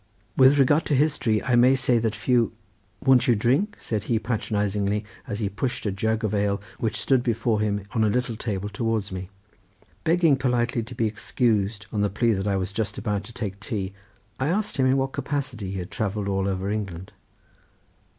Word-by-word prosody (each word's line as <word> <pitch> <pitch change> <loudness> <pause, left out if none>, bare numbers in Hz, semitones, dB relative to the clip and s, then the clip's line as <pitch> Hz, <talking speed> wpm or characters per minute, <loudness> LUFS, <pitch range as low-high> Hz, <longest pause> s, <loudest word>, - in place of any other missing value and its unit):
With 135 +2 +6
regard 145 +4 +4
to 145 - +2
history 135 -7 +2
I 125 - +2
may 125 +2 +6
say 125 -2 +2
that 110 -1 -1
few—. 115 +3 +2 0.5
Won't 130 -2 +5
you 120 - +5
drink?" 135 - +1
said 105 -2 -3
he, 115 - +1
patronizingly, 105 -2 -1 0.2
as 105 +1 -4
he 105 - +1
pushed 120 +7 -3
a 105 - +1
jug 110 +3 -1
of 110 -1 0
ale 100 -1 +1 0.2
which 110 -2 -1
stood 130 +2 +3
before 115 -2 0
him 105 -2 -1
on 115 -3 +1
a 110 - +3
little 120 +1 0
table 105 -3 -3
towards 105 -1 -2
me. 95 0 -5 0.7
Begging 165 -3 +4
politely 125 -2 +1
to 120 +2 -8
be 115 - +1
excused 105 -1 0
on 105 - -1
the 105 - +2
plea 115 +5 +1
that 100 -1 -1
I 100 - +1
was 95 0 -2
just 105 0 -2
about 105 -3 -2
to - - -11
take 100 -4 -5
tea, 100 -3 -4 0.5
I 130 - 0
asked 205 +6 -1
him 130 -1 +3
in 130 +1 +3
what 135 0 0
capacity 135 -10 -3
he - - -3
had 90 +2 -6
travelled 100 0 -2
all 95 0 0
over 95 +1 -1
England. 95 -4 -4
110 Hz, 200 wpm, -25 LUFS, 100-125 Hz, 0.7 s, With